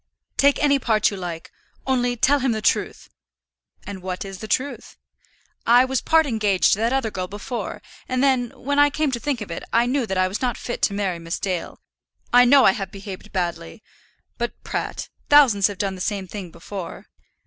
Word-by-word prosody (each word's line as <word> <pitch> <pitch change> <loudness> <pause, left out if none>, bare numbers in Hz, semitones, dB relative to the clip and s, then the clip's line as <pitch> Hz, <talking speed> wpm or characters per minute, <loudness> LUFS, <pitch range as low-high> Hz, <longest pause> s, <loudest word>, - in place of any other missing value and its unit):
"Take 280 0 +4
any 280 -1 +4
part 220 -4 +2
you - - -5
like, 175 -3 -6 0.3
only 245 -2 0
tell 285 +5 +3
him 260 -3 +1
the 220 - -2
truth." - - 0 0.7
"And 200 -2 -7
what 185 +1 -4
is 195 -1 -8
the 220 - -7
truth?" 280 +5 -3 0.7
"I 245 +2 +6
was 260 -1 -1
part 320 0 +4
engaged 215 -7 +2
to 200 - 0
that 230 +2 +1
other 265 -5 0
girl 185 -2 -4
before; 210 +5 -6 0.3
and 255 +1 0
then, 255 -3 +2
when 285 +2 -1
I 290 0 +6
came 300 0 -1
to 240 - -2
think 275 -3 -2
of 200 - -6
it, - - -5
I 235 +1 +3
knew 255 -1 0
that 190 - -2
I 185 0 +3
was 190 +3 -4
not 245 -2 -1
fit 240 - -5
to 200 - +1
marry 190 -4 -1
Miss 165 0 -4
Dale. 185 -3 -4 0.5
I 245 0 +8
know 270 +2 +6
I - - +7
have 195 0 -5
behaved 195 +1 -9
badly; 170 - -4 0.6
but, 240 0 -2
Pratt, - - -4 0.2
thousands 255 -10 +6
have 205 -2 -7
done 195 0 -1
the 185 - -8
same 200 0 -2
thing 190 -1 -7
before." 170 +2 -8
220 Hz, 205 wpm, -22 LUFS, 190-260 Hz, 0.7 s, I